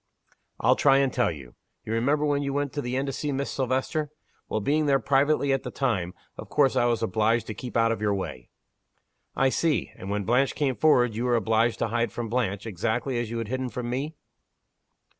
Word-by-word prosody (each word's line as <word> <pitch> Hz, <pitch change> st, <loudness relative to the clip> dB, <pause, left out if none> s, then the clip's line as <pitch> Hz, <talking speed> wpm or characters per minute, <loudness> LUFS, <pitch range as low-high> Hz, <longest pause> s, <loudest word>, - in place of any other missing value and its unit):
"I'll -, -, +4 dB
try 135 Hz, -1 st, +4 dB
and 135 Hz, -1 st, +2 dB
tell 120 Hz, -, +2 dB
you. 70 Hz, -6 st, -10 dB, 0.3 s
You 110 Hz, -, -3 dB
remember 140 Hz, +6 st, +1 dB
when 145 Hz, -1 st, +1 dB
you 140 Hz, -1 st, -2 dB
went 145 Hz, -1 st, -1 dB
to 145 Hz, -, -2 dB
the 125 Hz, 0 st, -3 dB
inn 135 Hz, +1 st, 0 dB
to 135 Hz, -, -3 dB
see 150 Hz, +2 st, -2 dB
Miss 140 Hz, 0 st, -2 dB
Silvester? 130 Hz, +3 st, -1 dB, 0.4 s
Well, -, -, 0 dB
being 150 Hz, +8 st, +1 dB
there 140 Hz, -1 st, +4 dB
privately 140 Hz, +2 st, +2 dB
at 135 Hz, -, 0 dB
the -, -, -6 dB
time, 100 Hz, -10 st, -1 dB, 0.2 s
of -, -, -8 dB
course 140 Hz, -3 st, +3 dB
I 120 Hz, -, +3 dB
was 120 Hz, -1 st, +1 dB
obliged 110 Hz, +3 st, +1 dB
to 110 Hz, -, -5 dB
keep 120 Hz, +3 st, -5 dB
out 115 Hz, 0 st, +3 dB
of 115 Hz, -, -3 dB
your 105 Hz, -1 st, +1 dB
way." 65 Hz, -10 st, -6 dB, 0.9 s
"I 135 Hz, -, +3 dB
see! 160 Hz, +3 st, 0 dB
And, 95 Hz, -, -8 dB
when 100 Hz, 0 st, -1 dB
Blanche 125 Hz, +6 st, +2 dB
came 140 Hz, -4 st, +1 dB
afterward, 125 Hz, -5 st, +3 dB
you 115 Hz, +3 st, -2 dB
were 120 Hz, -1 st, +2 dB
obliged 115 Hz, 0 st, +2 dB
to 115 Hz, -, -1 dB
hide 115 Hz, -1 st, 0 dB
from 120 Hz, -2 st, -4 dB
Blanche, 110 Hz, -4 st, -1 dB
exactly 115 Hz, +5 st, -1 dB
as 120 Hz, -2 st, -3 dB
you 115 Hz, -, -4 dB
had 115 Hz, -2 st, -4 dB
hidden 130 Hz, 0 st, -2 dB
from 120 Hz, 0 st, -4 dB
me?" 145 Hz, +6 st, -3 dB
125 Hz, 220 wpm, -26 LUFS, 115-140 Hz, 0.9 s, I'll